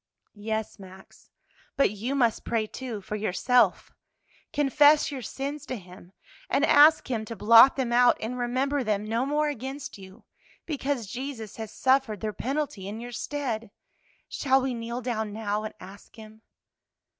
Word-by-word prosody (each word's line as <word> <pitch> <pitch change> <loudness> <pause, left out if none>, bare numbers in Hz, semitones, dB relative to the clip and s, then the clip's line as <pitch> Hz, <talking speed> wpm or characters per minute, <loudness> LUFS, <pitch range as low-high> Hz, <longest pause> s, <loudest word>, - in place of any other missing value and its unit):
"Yes, 220 +1 -4
Max, 190 0 -15 0.5
but 275 - +3
you 225 +7 -3
must 235 -5 +1
pray, 225 -2 -1
too, 230 -1 -7
for 210 - -5
yourself; 215 +4 +1 0.6
confess 290 +1 +4
your 270 -2 -5
sins 280 +4 -5
to 255 - -3
Him, 180 -1 -14 0.4
and - - +2
ask 300 -1 +5
Him 225 -3 -1
to 230 - -7
blot 230 +5 +7
them 250 -3 -1
out 245 0 +5
and 230 +3 -4
remember 260 +3 -1
them 210 -2 -1
no 230 +4 -1
more 300 +1 +1
against 270 -3 -6
you, 190 +3 -14 0.4
because 280 -6 -2
Jesus 245 -1 -7
has 220 -2 -6
suffered 260 -5 +1
their 215 +1 -3
penalty 265 -8 -3
in 210 +2 -6
your 240 +1 -8
stead. 240 -5 -4 0.6
Shall 265 -2 +2
we 260 -1 -1
kneel 235 +1 -5
down 220 -3 -3
now 210 0 -2
and 215 - -7
ask 195 +2 -13
Him?" 220 0 -13
235 Hz, 155 wpm, -26 LUFS, 215-270 Hz, 0.6 s, blot